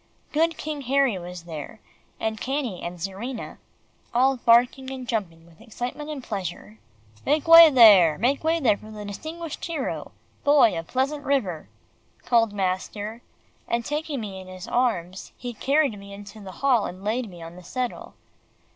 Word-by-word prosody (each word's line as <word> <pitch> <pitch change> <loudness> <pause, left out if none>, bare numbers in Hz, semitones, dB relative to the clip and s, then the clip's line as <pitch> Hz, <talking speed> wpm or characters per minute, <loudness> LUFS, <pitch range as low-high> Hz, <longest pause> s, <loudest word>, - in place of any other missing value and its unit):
Good 325 +2 +1
King 300 -2 -5
Harry 270 -7 +2
was 175 0 -8
there, 160 +4 -8 0.4
and 220 -1 -3
Cannie 260 -8 -2
and 175 +1 -6
Czarina, 200 +8 -6 0.6
all 265 +2 +4
barking 245 +3 +3
and 260 -2 -7
jumping 170 -8 -3
with 170 +3 -20
excitement 245 +6 -6
and 290 -4 -6
pleasure. 175 - -6 0.4
"Make 295 +2 +1
way 330 0 +11
there, 205 - +7
make 265 - +1
way 325 +1 +2
there 220 -9 +3
for 215 - -13
the 210 -1 -8
distinguished 315 +10 -7
hero 320 -6 -4 0.3
Boy 285 -6 +5
of 165 0 -5
Pleasant 275 +3 -1
River," 220 - -1 0.6
called 230 -3 +3
master, 205 +3 -3 0.5
and 235 0 -1
taking 295 -3 -3
me 195 -3 -6
in 185 - -13
his 185 -1 -9
arms, 190 -7 -1
he 245 -1 -6
carried 275 -2 +1
me 200 0 -11
into 205 +2 -11
the 195 -2 -9
hall 250 -6 +3
and 185 +2 -9
laid 225 +2 -1
me 175 -2 -11
on 165 +1 -10
the 180 - -12
settle. 250 +7 -5
230 Hz, 165 wpm, -25 LUFS, 190-275 Hz, 0.6 s, way